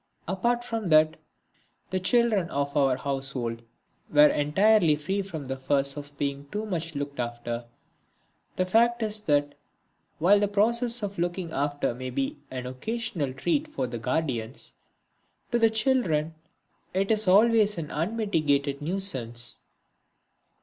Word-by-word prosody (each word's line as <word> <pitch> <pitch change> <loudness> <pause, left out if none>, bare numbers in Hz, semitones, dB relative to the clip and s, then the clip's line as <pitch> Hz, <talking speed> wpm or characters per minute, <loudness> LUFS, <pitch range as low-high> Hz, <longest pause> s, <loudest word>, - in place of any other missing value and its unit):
Apart 235 +7 0
from 225 -5 -3
that, 155 0 +5 0.8
the 185 - 0
children 215 -3 +2
of 140 +1 -2
our 135 -3 +3
household 135 -4 -2 0.5
were 150 0 +7
entirely 165 +3 +3
free 190 +7 -2
from 165 -7 -7
the 135 0 -4
fuss 140 +1 +1
of 145 -1 -9
being 140 0 -3
too 210 +2 -3
much 165 -5 -3
looked 140 -1 -5
after. 120 0 -4 0.9
The 185 - +1
fact 235 +4 +3
is 215 0 -1
that, 145 -7 +1 0.6
while 195 +5 +5
the 205 - +2
process 235 +3 +1
of 200 -3 -4
looking 175 0 -2
after 145 -2 -1
may 130 +1 -6
be 275 - -3
an 130 -1 -5
occasional 165 - -3
treat 295 - -1
for 300 - -3
the 120 -1 -5
guardians, 125 -2 -3 0.8
to 240 - +2
the 225 -1 +5
children 215 - +1 0.6
it 195 +3 +1
is 215 -2 +1
always 210 +1 +4
an 155 -3 -5
unmitigated 155 -7 0
nuisance. 130 - +1
160 Hz, 135 wpm, -27 LUFS, 140-210 Hz, 0.9 s, were